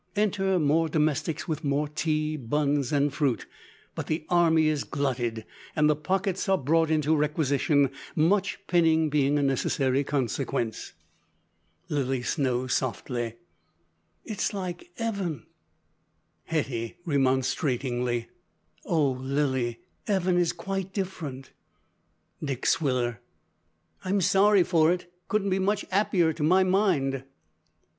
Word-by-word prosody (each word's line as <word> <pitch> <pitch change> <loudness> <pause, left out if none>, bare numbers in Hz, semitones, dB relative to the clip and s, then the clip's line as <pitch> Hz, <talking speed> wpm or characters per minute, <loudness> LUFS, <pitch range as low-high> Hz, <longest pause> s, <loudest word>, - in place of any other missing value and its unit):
Enter 195 -2 +1
more 160 +1 +2
domestics 155 +1 0
with 155 -1 -3
more 145 +1 0
tea, 155 0 -1
buns, 140 0 0
and 145 -1 +2
fruit; 140 -5 0 0.5
but - - -5
the 155 0 -2
army 165 -3 +4
is 155 -2 0
glutted, 120 -6 -2 0.3
and 150 -1 +4
the 150 - +3
pockets 190 +5 -1
are 190 - +4
brought 160 +3 +2
into 155 0 +2
requisition: 145 -2 +2 0.2
much 190 +6 +2
pinning 160 -4 +3
being 145 0 +2
a 145 - +1
necessary 135 0 +1
consequence. 130 -3 -2 0.9
(Lilly 135 -3 -1
Snow, 130 -3 0
softly.) 120 -2 -2 0.9
"It's 210 -2 -2
like 180 -2 -5
'eaven!" 200 - -3 1.0
(Hetty, 135 -5 -2
remonstratingly.) 130 -4 0 0.6
"Oh! 155 -5 +2
Lilly, 130 -2 -1 0.3
'eaven 190 -3 +1
is 175 -2 +2
quite 190 +2 -4
different." 155 -9 -5 0.9
(Dick 135 -4 -3
Swiller.) 125 -7 +1 0.8
"I'm 195 +2 +1
sorry 195 +1 +4
for 165 -2 +3
it. 175 0 -4
Couldn't 200 -2 0
be 190 - +1
much 205 +2 0
'appier 185 -4 +2
to 155 - -8
my 180 +5 +4
mind." 175 -9 +1
150 Hz, 115 wpm, -27 LUFS, 135-175 Hz, 1.0 s, army